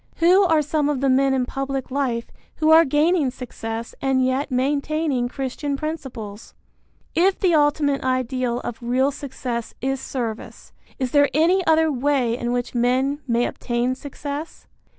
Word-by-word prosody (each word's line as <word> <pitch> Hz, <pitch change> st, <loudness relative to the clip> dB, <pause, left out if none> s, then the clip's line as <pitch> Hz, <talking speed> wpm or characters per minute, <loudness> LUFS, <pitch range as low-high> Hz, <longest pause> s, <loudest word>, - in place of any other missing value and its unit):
Who 360 Hz, +4 st, +5 dB
are 320 Hz, -3 st, +3 dB
some 295 Hz, 0 st, 0 dB
of 290 Hz, -3 st, 0 dB
the 270 Hz, 0 st, +2 dB
men 270 Hz, +1 st, +3 dB
in 260 Hz, -2 st, +1 dB
public 270 Hz, 0 st, -4 dB
life 255 Hz, -4 st, -1 dB, 0.2 s
who 315 Hz, 0 st, +2 dB
are 325 Hz, +1 st, +8 dB
gaining 300 Hz, +1 st, +2 dB
success 230 Hz, -3 st, -6 dB
and 265 Hz, -1 st, +2 dB
yet 260 Hz, +3 st, 0 dB
maintaining 280 Hz, 0 st, 0 dB
Christian 275 Hz, +2 st, -3 dB
principles? 260 Hz, -9 st, -6 dB, 0.6 s
If 370 Hz, +3 st, +2 dB
the 365 Hz, -3 st, +2 dB
ultimate 290 Hz, -2 st, +2 dB
ideal 255 Hz, -1 st, -1 dB
of 240 Hz, -, -6 dB
real 255 Hz, +4 st, +1 dB
success 250 Hz, -4 st, -5 dB
is 270 Hz, 0 st, -2 dB
service, 230 Hz, -6 st, -6 dB, 0.2 s
is 255 Hz, -3 st, -2 dB
there 285 Hz, -1 st, +4 dB
any 350 Hz, +5 st, +3 dB
other 320 Hz, 0 st, +4 dB
way 260 Hz, -3 st, +1 dB
in 240 Hz, 0 st, -3 dB
which 245 Hz, 0 st, -2 dB
men 260 Hz, +4 st, +1 dB
may 240 Hz, 0 st, +2 dB
obtain 240 Hz, +1 st, -1 dB
success? 285 Hz, +3 st, -7 dB
270 Hz, 150 wpm, -22 LUFS, 250-295 Hz, 0.6 s, are